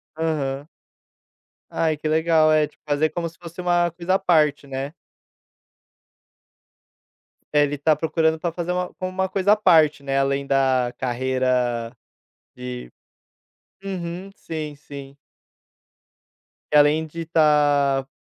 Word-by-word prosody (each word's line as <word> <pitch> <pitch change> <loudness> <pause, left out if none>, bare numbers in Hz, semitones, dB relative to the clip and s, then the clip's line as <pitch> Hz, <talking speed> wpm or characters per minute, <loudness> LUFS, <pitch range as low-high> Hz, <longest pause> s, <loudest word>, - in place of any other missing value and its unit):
Aham. 150 -3 -2 1.0
Ai 160 -2 0
que 155 - -4
legal, 160 0 +3
é 155 -1 +3
tipo - - -27
fazer 150 +2 +1
como 170 +1 -3
se 165 - -22
fosse 170 +1 -9
uma 175 -1 +2
coisa 175 +2 -1
à - - +2
parte, 155 -6 +2
né. 135 +1 -5 2.6
Deve 145 -1 +3
está 150 +2 +2
procurando 160 0 0
para 170 +1 -2
fazer 175 0 -3
uma 180 0 -2
como 185 - -5
uma 190 0 -1
coisa 195 +2 +3
à - - +4
parte, 160 -8 +4
né. 135 0 0
Além 140 0 0
da 130 -3 +1
carreira 125 -2 -1 0.7
de 60 -1 -7 0.9
uhum. 185 0 -5
Sim, 155 -2 -6
sim. 140 -1 -11 1.6
E - - +1
além 150 +2 +4
de 165 +2 -7
estar 145 -4 +2
155 Hz, 125 wpm, -22 LUFS, 140-170 Hz, 2.6 s, à